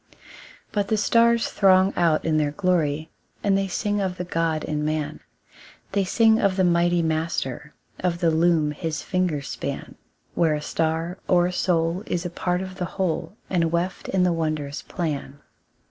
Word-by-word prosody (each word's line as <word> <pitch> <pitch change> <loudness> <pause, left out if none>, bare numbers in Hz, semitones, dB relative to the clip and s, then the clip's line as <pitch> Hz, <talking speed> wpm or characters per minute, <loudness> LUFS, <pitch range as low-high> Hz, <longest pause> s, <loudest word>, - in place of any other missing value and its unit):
But 205 -2 0
the 220 - +1
stars 230 +2 +3
throng 190 0 +4
out 165 -3 +2
in 160 -1 +2
their 150 -1 +2
glory, 160 -3 0 0.3
And 200 -1 +3
they 195 0 +1
sing 205 +2 -1
of 185 -2 -2
the 180 - -3
God 165 -3 -1
in 150 -1 -2
man; 155 -1 -2 0.7
They 200 0 +1
sing 225 +3 +4
of 195 -3 +2
the 190 - +2
Mighty 175 0 +3
Master, 155 -3 -2 0.2
Of 175 -2 0
the 170 -1 +2
loom 160 -2 +3
his 155 +1 -4
fingers 180 -7 -1
span, - - -5 0.4
Where 160 -3 +2
a - - -2
star 165 +3 -1
or 175 -1 +4
a 180 - -2
soul 170 0 +1
is 175 0 -2
a 175 - -3
part 180 +1 -1
of 185 0 -8
the 180 - -2
whole, 180 0 -2
And 170 -3 +1
weft 175 +2 -2
in 190 -1 +2
the 180 -1 +3
wondrous 155 -3 -2
plan. 150 -5 -4
175 Hz, 175 wpm, -24 LUFS, 160-185 Hz, 0.7 s, throng